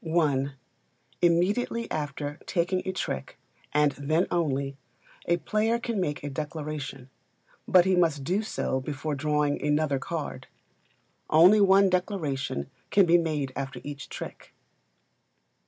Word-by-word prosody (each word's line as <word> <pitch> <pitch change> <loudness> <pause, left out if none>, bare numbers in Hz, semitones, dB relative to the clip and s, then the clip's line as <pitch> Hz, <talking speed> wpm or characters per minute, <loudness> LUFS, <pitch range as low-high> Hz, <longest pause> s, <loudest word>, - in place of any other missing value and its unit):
i. 155 -5 +1 0.7
Immediately 195 +7 +1
after 145 -1 -4
taking 185 +1 0
a - - +1
trick, 65 - -4 0.3
and 150 0 +3
then 155 +6 0
only, 140 -5 0 0.5
a 170 - +3
player 215 +7 +1
can 235 -4 -2
make 150 -5 -2
a 145 - -3
Declaration; 150 -3 -5 0.6
but 180 -1 +6
he 190 -1 +3
must 160 -6 +2
do 185 +9 +1
so 215 -10 -2
before 150 +2 -4
drawing 150 0 0
another 150 -1 +1
card. 160 +1 -5 0.8
Only 180 +7 +7
one 195 0 +6
Declaration 155 - -2 0.2
can 200 -2 +5
be 175 0 +5
made 150 -5 -2
after 135 -1 -4
each 145 0 -7
trick. - - -9
155 Hz, 125 wpm, -27 LUFS, 145-180 Hz, 0.8 s, Only